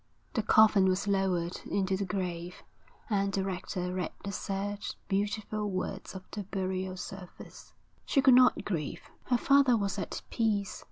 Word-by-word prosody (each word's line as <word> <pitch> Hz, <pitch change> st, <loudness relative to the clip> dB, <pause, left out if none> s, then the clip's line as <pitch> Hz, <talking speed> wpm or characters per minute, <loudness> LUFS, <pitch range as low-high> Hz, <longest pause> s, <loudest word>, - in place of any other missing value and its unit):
The 225 Hz, -, +1 dB
coffin 215 Hz, -2 st, +6 dB
was 185 Hz, +2 st, +1 dB
lowered 185 Hz, -3 st, 0 dB
into 195 Hz, -1 st, +1 dB
the 195 Hz, +1 st, -2 dB
grave, 180 Hz, -2 st, -4 dB, 0.4 s
and 200 Hz, -3 st, +1 dB
the 195 Hz, 0 st, 0 dB
rector 180 Hz, -1 st, -3 dB
read 180 Hz, -3 st, -2 dB
the 200 Hz, -, -3 dB
sad, 200 Hz, +1 st, -3 dB, 0.3 s
beautiful 210 Hz, +1 st, -1 dB
words 190 Hz, +1 st, -4 dB
of 190 Hz, -, -7 dB
the 210 Hz, -, -4 dB
burial 190 Hz, -1 st, -3 dB
service. 185 Hz, -1 st, -10 dB, 0.3 s
She -, -, +3 dB
could 265 Hz, -1 st, +7 dB
not 250 Hz, 0 st, +5 dB
grieve. 160 Hz, -8 st, -3 dB, 0.2 s
Her 245 Hz, -, +2 dB
father 275 Hz, -1 st, +5 dB
was 200 Hz, -1 st, -1 dB
at 185 Hz, -, -4 dB
peace. 210 Hz, -4 st, 0 dB
195 Hz, 155 wpm, -30 LUFS, 185-210 Hz, 0.4 s, could